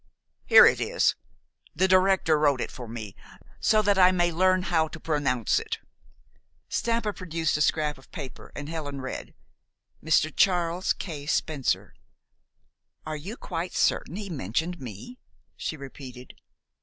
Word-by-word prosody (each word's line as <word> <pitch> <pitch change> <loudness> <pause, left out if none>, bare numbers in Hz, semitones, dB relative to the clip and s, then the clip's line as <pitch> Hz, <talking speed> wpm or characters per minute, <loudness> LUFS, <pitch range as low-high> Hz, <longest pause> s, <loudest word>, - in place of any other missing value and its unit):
"Here - - +9
it - - +3
is. - - +2 0.6
The 185 +5 +3
director 185 -4 +4
wrote 145 -3 +3
it - - -3
for 125 -4 -8
me, 110 -3 -7 0.4
so 215 -1 +3
that 200 -1 +3
I 185 0 +7
may 175 -1 +2
learn 185 +2 +3
how 160 -3 +1
to 155 - -10
pronounce 140 -8 +1
it." - - -4 0.9
Stampa 230 -2 0
produced 165 -4 -2
a 150 - 0
scrap 150 -2 +1
of 135 - -21
paper, 130 - -9
and 145 0 -6
Helen 145 -4 -5
read, 130 - -6 0.7
"Mr. 155 0 +2
Charles 180 -1 +2
K. 150 -6 -7
Spencer." 150 -4 -1 1.1
"Are 155 -1 -3
you 190 +11 -7
quite 170 +2 -5
certain - - +1
he 205 0 -5
mentioned 160 - -2
me?" 125 - -9 0.4
she 155 - -4
repeated. 130 -2 -10
160 Hz, 145 wpm, -26 LUFS, 140-185 Hz, 1.1 s, Here